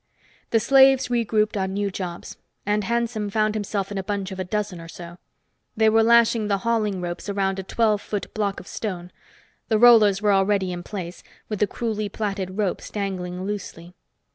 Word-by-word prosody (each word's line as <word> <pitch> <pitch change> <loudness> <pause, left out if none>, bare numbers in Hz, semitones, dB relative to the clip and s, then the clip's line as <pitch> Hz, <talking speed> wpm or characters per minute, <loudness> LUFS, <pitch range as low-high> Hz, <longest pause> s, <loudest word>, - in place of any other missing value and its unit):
The 225 - +3
slaves 265 +2 +5
regrouped 220 -3 +1
on 190 -1 -1
new 200 0 -1
jobs, 180 -2 -6 0.3
and 210 +1 +1
Hanson 235 -2 -1
found 215 +1 +1
himself 205 -2 -3
in 200 - -3
a - - -3
bunch 200 0 -3
of 190 - -7
a - - -1
dozen 200 -2 -3
or 165 - -10
so. 175 +1 -10 0.6
They 220 0 +5
were 225 +1 +4
lashing 230 -1 +4
the 200 -1 +1
hauling 215 -5 0
ropes 175 +3 -5
around 195 -1 -1
a - - -4
twelve 215 +1 +1
foot 205 -3 -5
block 205 -2 -1
of - - -12
stone; 180 -5 -5 0.6
the 220 - +3
rollers 215 -4 +6
were 210 -1 +2
already 195 -1 +2
in 175 - -5
place, 180 -2 -7 0.3
with 210 -2 -3
the 210 - +3
crudely 215 -3 -3
plaited 195 -2 -4
ropes 205 -4 -2
dangling 185 -3 -4
loosely. 180 -4 -6
205 Hz, 185 wpm, -23 LUFS, 190-215 Hz, 0.6 s, rollers